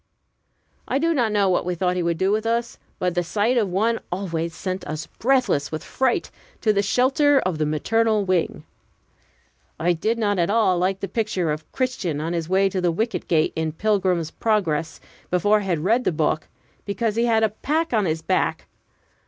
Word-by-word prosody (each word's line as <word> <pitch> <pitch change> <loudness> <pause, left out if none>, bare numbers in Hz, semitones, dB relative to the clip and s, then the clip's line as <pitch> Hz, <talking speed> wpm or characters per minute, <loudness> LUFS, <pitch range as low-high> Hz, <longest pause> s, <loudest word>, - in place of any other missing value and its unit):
I - - 0
do 330 +3 +2
not 240 -7 +1
know 205 -2 +2
what 185 - +2
we 180 0 -2
thought 180 +1 0
he 180 - 0
would 170 -1 0
do 190 +3 +1
with 215 +1 +1
us, 235 +1 -1 0.2
but 180 -1 -1
the 175 - +1
sight 210 +7 0
of 215 -5 +2
one 220 +5 +1
always 170 -3 -3
sent 185 0 -4
us 155 +1 -4
breathless 250 - 0
with 155 - -4
fright 260 -2 0 0.3
to 215 -2 +3
the 200 - +2
shelter 270 +7 +3
of 180 -7 -2
the 155 - +1
maternal 215 +7 +1
wing. 180 -4 0 1.2
I 175 +2 +2
did 215 +8 -1
not 205 -4 0
at 170 - +2
all 205 -5 +3
like 190 +1 0
the 195 - -2
picture 195 -5 -1
of 155 +1 -6
Christian 205 - -2
on 165 +3 -2
his 165 -1 -3
way 190 +1 +3
to 190 -1 -2
the 175 -1 +2
wicket 220 +7 -2
gate, 160 -2 +2
in 160 -1 -2
"Pilgrim's 185 -4 0
Progress," 170 -8 -1 0.3
before 205 +4 +3
I - - -5
had 175 -5 0
read 230 +7 +2
the - - +1
book, 155 -1 0 0.4
because 215 +1 -2
he 230 +1 +2
had 225 -2 +3
"a 220 - +4
pack 305 +8 -2
on 215 -3 +2
his 160 -1 -2
back." - - 0
195 Hz, 200 wpm, -23 LUFS, 170-225 Hz, 1.2 s, a